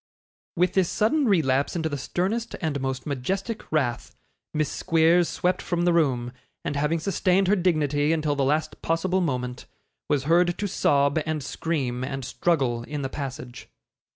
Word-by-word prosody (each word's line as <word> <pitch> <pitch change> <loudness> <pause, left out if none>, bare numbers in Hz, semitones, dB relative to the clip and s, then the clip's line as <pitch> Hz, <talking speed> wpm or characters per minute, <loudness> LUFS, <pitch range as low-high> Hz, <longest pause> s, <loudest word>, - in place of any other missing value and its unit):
With 180 +1 +2
this 190 -3 +2
sudden 275 +8 +2
relapse 145 -9 +2
into 160 -2 0
the 150 - -3
sternest 205 - -2
and 145 -4 -2
most 130 -1 -3
majestic 190 - -3
wrath, 130 -6 -1 0.4
Miss 155 -1 -1
Squeers 165 0 +3
swept 180 +1 0
from 175 -1 -1
the 175 0 +3
room; 130 -7 +1 0.3
and 145 - -2
having 150 +3 +1
sustained 185 +2 +1
her 205 - +4
dignity 155 -5 +1
until 155 -2 +1
the 140 - +1
last 150 +4 0
possible 180 +3 0
moment, 125 -6 -3 0.4
was 145 -3 +1
heard 175 +3 +3
to 205 - -1
sob 140 -4 +2
and 155 -2 -3
scream 130 -5 -2
and 135 0 -4
struggle 130 -7 0
in 145 +4 -5
the 135 - -2
passage. 130 -3 -7
155 Hz, 160 wpm, -25 LUFS, 135-175 Hz, 0.4 s, her